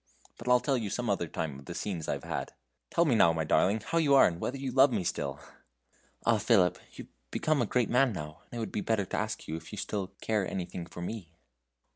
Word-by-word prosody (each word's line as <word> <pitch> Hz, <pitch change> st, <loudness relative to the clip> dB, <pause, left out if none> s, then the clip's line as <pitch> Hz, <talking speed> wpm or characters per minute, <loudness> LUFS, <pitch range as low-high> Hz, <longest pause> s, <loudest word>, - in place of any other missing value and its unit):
But 115 Hz, -, -9 dB
I'll 125 Hz, 0 st, +6 dB
tell 135 Hz, 0 st, +1 dB
you 110 Hz, -3 st, -3 dB
some 120 Hz, +1 st, -1 dB
other 90 Hz, -4 st, 0 dB
time 75 Hz, -3 st, -4 dB
of 70 Hz, -, -14 dB
the 85 Hz, -, -7 dB
scenes 85 Hz, -6 st, -3 dB
I've -, -, -2 dB
had. -, -, -4 dB, 0.4 s
Tell 170 Hz, -, +3 dB
me 145 Hz, -, +3 dB
now, 85 Hz, -7 st, +5 dB
my 80 Hz, -1 st, -1 dB
darling, 100 Hz, +7 st, +2 dB
how 165 Hz, +10 st, 0 dB
you 145 Hz, -4 st, +4 dB
are, 135 Hz, -, +8 dB
and 85 Hz, -1 st, -1 dB
whether 135 Hz, -, -2 dB
you 135 Hz, -1 st, -3 dB
love 135 Hz, +2 st, +6 dB
me 105 Hz, -6 st, 0 dB
still!" 70 Hz, -5 st, -2 dB, 0.9 s
"Ah! 115 Hz, -2 st, +4 dB
Philip, 100 Hz, -4 st, +3 dB
you've -, -, -10 dB, 0.2 s
become 155 Hz, -, +1 dB
a -, -, +1 dB
great 125 Hz, -2 st, +1 dB
man 125 Hz, +1 st, +3 dB
now, 75 Hz, -5 st, -7 dB
and 120 Hz, -, -9 dB
it -, -, -3 dB
would 110 Hz, -4 st, -3 dB
be 105 Hz, -, -2 dB
better 110 Hz, -3 st, 0 dB
to -, -, -4 dB
ask -, -, -3 dB
if 80 Hz, +1 st, -6 dB
you 105 Hz, -, -7 dB
still 100 Hz, -1 st, -2 dB
care 105 Hz, -4 st, 0 dB
anything 90 Hz, -1 st, -5 dB
for 85 Hz, -, -8 dB
me." 95 Hz, -3 st, -5 dB
105 Hz, 240 wpm, -30 LUFS, 85-125 Hz, 0.9 s, are